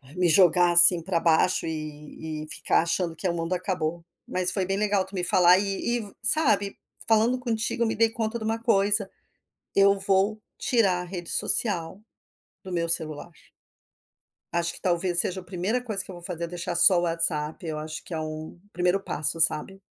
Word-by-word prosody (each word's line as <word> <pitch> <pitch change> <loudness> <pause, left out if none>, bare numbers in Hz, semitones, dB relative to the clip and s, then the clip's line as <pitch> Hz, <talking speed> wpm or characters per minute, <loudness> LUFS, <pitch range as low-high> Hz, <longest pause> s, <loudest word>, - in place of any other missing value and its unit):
Me 180 -1 0
jogar 175 +1 +3
assim 175 0 +9
pra 170 -1 -3
baixo 165 +2 0
e 155 0 -8
e - - -12
ficar - - -1
achando 170 0 -3
que 185 - -5
o - - -3
mundo 165 +1 -4
acabou, 175 -2 -4 0.2
mas 185 0 0
foi 190 -3 -3
bem 195 +1 -3
legal 205 -2 -1
tu - - -14
me 180 -2 -4
falar 180 +1 +3
e 205 +4 -3
e 205 -3 -10
sabe, 225 -7 +3 0.3
falando 230 +3 +1
contigo 235 0 -3
eu - - -1
me - - -4
dei 225 +1 +1
conta 225 0 -5
de 220 - -8
uma 225 +1 -3
coisa. 205 -3 +1 0.7
Eu 200 0 +2
vou 195 +2 -1 0.2
tirar 195 -8 0
a - - -7
rede 175 -1 -8
social, 200 -4 +1 0.6
do 190 - -11
meu 170 -1 -3
celular. 160 0 -2 1.2
Acho 170 0 -1
que - - -12
talvez 175 -1 +2
seja 190 +1 -5
o - - -13
primeira 190 +7 -3
coisa 215 -5 -4
que 195 - -12
eu - - -11
vou 175 - -13
fazer 170 -1 -7
é - - -4
deixar 175 0 -6
só 180 0 +5
o - - -3
WhatsApp, 165 -1 0
acho 155 0 -8
que 175 - -11
é 160 - -4
o 155 +2 -8 0.2
primeiro 180 +2 -1
passo, 155 -2 +3
sabe. 165 +5 +4
180 Hz, 195 wpm, -24 LUFS, 165-200 Hz, 1.2 s, assim